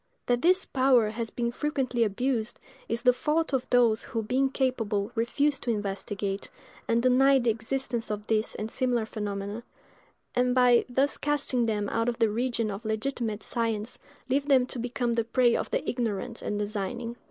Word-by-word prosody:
That 245 0 +1
this 365 +4 +4
power 255 -5 +3
has 225 0 -4
been 235 +1 -2
frequently 255 -3 0
abused, 230 +2 -1 0.3
is 230 +1 -1
the 250 -1 +6
fault 300 +4 0
of 260 -1 -1
those 235 -3 +4
who, 225 -2 -3
being 260 +5 +1
capable, 225 -6 -1
refuse 280 +5 +1
to 240 - -5
investigate, 200 -1 -3 0.4
and 230 +1 +2
deny 270 +2 +5
the 240 -3 +2
existence 235 +1 -3
of 210 0 -4
these 220 0 0
and 215 +1 -4
similar 245 -4 +1
phenomena; 205 0 -4 0.7
and, 250 0 +2
by 250 -2 +5
thus 270 +3 +1
casting 280 -5 0
them 210 -2 -1
out 230 +1 0
of 235 - -3
the 225 -3 +2
region 235 -1 -1
of 200 +3 -6
legitimate 220 -1 -2
science, 230 -1 -2 0.3
leave 275 +2 0
them 265 -3 +5
to 250 - -6
become 245 0 -1
the 230 0 +1
prey 240 +1 +3
of - - -2
the - - -2
ignorant 235 -1 -2
and 210 - -2
designing. 215 +3 -3
235 Hz, 175 wpm, -28 LUFS, 220-255 Hz, 0.7 s, the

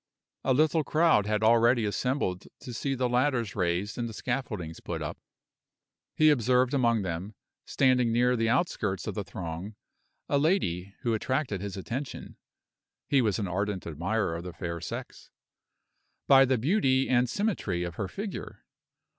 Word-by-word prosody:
A 130 -1 +2
little 155 +2 +3
crowd 155 -10 +3
had 105 0 0
already 115 +1 +4
assembled 105 -4 -1
to 125 - -8
see 135 +4 -2
the 125 -1 0
ladders 125 -4 +1
raised 95 +4 -1
and 120 -1 -2
the 110 - -9
scaffoldings 105 -12 -4
put - - -5
up. - - -5 1.0
He 155 0 +6
observed 125 0 +2
among 120 -5 +2
them, 95 +4 -4 0.3
standing 125 -3 +3
near 125 +2 +3
the 115 -1 +1
outskirts 110 - 0
of - - -3
the 105 - -3
throng, 90 +2 -6 0.5
a 140 - +2
lady 100 - 0
who 115 - 0
attracted 125 -3 -1
his 100 -1 -5
attention 130 +8 -6 0.7
(he 140 -2 +4
was 105 -5 +1
an 100 - -2
ardent 100 +1 -2
admirer 90 +4 -1
of 85 - -5
the 90 -1 -7
fair 85 -1 -5
sex) - - -7 1.0
by 135 -1 +7
the 130 0 +2
beauty 135 - +2
and 125 -1 +2
symmetry 125 - -1
of 85 -1 -4
her 95 +3 -3
figure. 200 - -7
115 Hz, 155 wpm, -28 LUFS, 95-130 Hz, 1.0 s, by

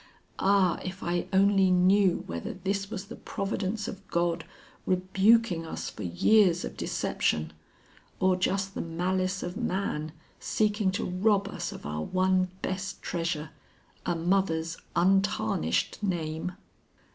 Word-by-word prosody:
Ah, 195 -3 +3
if 185 +1 -6
I 175 +1 -1
only 195 0 +4
knew 185 +1 +4
whether 85 0 -5
this 195 0 -2
was 200 -3 -5
the 210 - -9
providence 200 +1 -3
of 195 0 -8
God 170 -1 0 0.4
rebuking 190 +1 +3
us 160 - -5
for - - -10
years 175 - +3
of - - -7
deception, 80 0 -1 0.7
or 185 0 +4
just 195 +1 0
the - - -3
malice 185 +3 -1
of 175 +1 -4
man 185 -9 -2 0.3
seeking 210 -2 +1
to - - -1
rob 200 +2 +2
us 200 - -4
of - - -10
our 75 +1 -3
one 185 - +2
best 190 +1 -4
treasure, 165 -2 -2 0.5
a 175 - 0
mother's 165 -2 +1 0.2
untarnished 180 - +1
name!" 170 -3 -2
185 Hz, 130 wpm, -28 LUFS, 170-195 Hz, 0.7 s, only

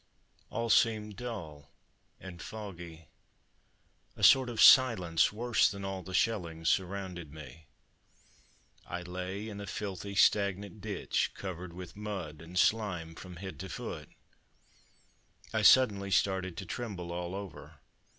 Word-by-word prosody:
All 115 0 -1
seemed 105 -1 +3
dull 85 - -7 0.5
and 90 -3 -10
foggy; 85 -7 -8 1.1
a - - -8
sort 130 -2 +7
of 115 -2 -5
silence, 110 -10 +6
worse 115 +1 +2
than 100 -1 -6
all 95 -1 -4
the 95 - -10
shelling, 85 -9 0
surrounded 90 -3 -1
me. 75 0 -12 1.2
I 90 - -5
lay 90 +4 -5
in 100 -2 -7
a 100 - -7
filthy 100 -1 -5
stagnant 100 0 +2
ditch - - -1
covered 90 -2 -6
with 90 0 -9
mud 95 -8 -6
and 85 +2 -8
slime 90 -6 +1
from 90 +2 -10
head 95 +2 -8
to 95 - -6
foot. - - -6 1.4
I 110 - +1
suddenly 105 -4 +5
started 95 -2 +1
to 95 - -5
tremble 95 -5 -5
all 90 +1 -4
over. 100 -5 -8
95 Hz, 130 wpm, -31 LUFS, 85-105 Hz, 1.4 s, sort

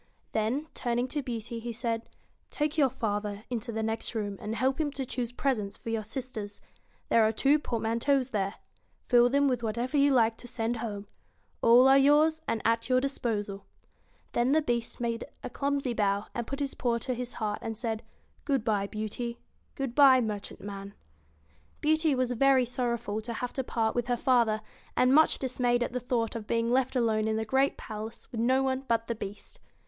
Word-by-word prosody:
Then, 225 +8 0
turning 240 0 -1
to 295 - -2
Beauty, 235 -2 -5
he 235 +1 -5
said: 230 0 -3 0.4
'Take 300 0 -1
your 285 -4 +4
father 210 -4 -3
into 235 -1 -3
the 220 0 -2
next 225 +2 -2
room, 205 -2 -2
and 215 0 -3
help 265 +5 +1
him 300 - 0
to 270 -2 -3
choose 245 -1 -3
presents 245 -6 -1
for 230 - -6
your 225 -1 -1
sisters. 215 -3 -5 0.5
There 230 - +5
are 215 - +3
two 275 +7 +3
port 235 -6 -3
manteaus 255 +4 +1
there. 200 -1 -1 0.5
Fill 245 -1 +5
them 280 +2 +3
with 250 -3 0
whatever 235 +5 -1
you 285 0 +5
like 230 -3 +3
to 245 - -10
send 235 -1 -2
home. 210 -3 -5 0.6
All 240 +3 +7
are 270 +1 +7
yours, 305 +3 +4
and 230 -1 -1
at 230 +1 +1
your 255 0 +4
disposal.' 215 -7 -2 0.6
Then 245 +3 +2
the 315 - +4
Beast 235 -3 -2
made 235 -1 -2 0.2
a - - -5
clumsy 280 -3 -1
bow, 200 -2 +1 0.2
put 275 +1 -4
his 280 -1 -1
paw 240 -2 0
to 255 +2 -3
his 250 0 -5
heart, 210 -2 -2
and 225 -1 -4
said: 225 -1 -2 0.2
* - - -36
Good 275 -6 0
bye, 205 -3 +1
Beauty; 220 +3 -4 0.4
good 270 -4 -3
bye, 270 -2 +7
merchantman.' 200 -2 -5 0.8
Beauty 315 -1 +2
was 255 -1 0
very 260 +1 +4
sorrowful 235 -3 -2
to 235 +2 -5
have 245 +2 -4
to 265 - -2
part 225 -2 0
with 240 -1 -1
her 245 -1 +1
father, 235 -4 +2 0.4
and 255 +1 +4
much 315 +2 +6
dismayed 245 -2 +1
at 245 - -4
the 250 - -1
thought 235 -2 -1
of 220 -2 -5
being 230 +1 +1
left 260 +1 +1
alone 220 -3 +2
in 220 - 0
the 220 0 -1
great 265 +4 +2
palace 215 0 -8
with 225 - -3
no 260 +3 +3
one 260 0 0
but 230 -1 +1
the 235 - -2
Beast. 205 -2 -8
235 Hz, 195 wpm, -29 LUFS, 220-260 Hz, 0.8 s, All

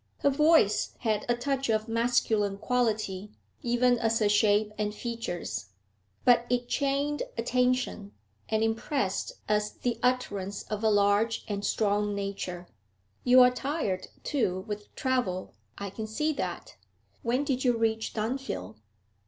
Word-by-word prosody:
Her 280 - +4
voice 300 -7 +3
had 215 -3 0
a 240 - +4
touch 270 +1 -1
of 215 0 +1
masculine 225 -3 +1
quality, 215 -4 -1 0.3
even 245 0 +2
as 225 -1 +2
her 215 - +2
shape 210 0 +3
and 210 0 -2
features, 175 - -4 0.6
but 240 -1 +5
it 245 0 0
chained 280 +2 0 0.2
attention, 250 -3 0 0.4
and 220 0 +1
impressed 225 -1 -1
as 210 0 +1
the 245 -2 -2
utterance 205 -6 -1
of 215 +1 -5
a 220 - +4
large 205 +2 +2
and 200 -1 -3
strong 205 -1 +1
nature. 195 -3 -4 0.6
'You 255 +1 +7
are 250 0 +7
tired, 250 - -2 0.2
too, 190 -11 0
with 210 0 -5
travel; 250 -9 -1 0.2
I 200 -1 -5
can 215 +2 -5
see 300 +9 0
that. - - -5 0.4
When 245 +4 +1
did 265 -3 -1
you 245 -3 +3
reach 225 -1 0
Dunfield?' 215 - -3
225 Hz, 135 wpm, -28 LUFS, 205-250 Hz, 0.6 s, You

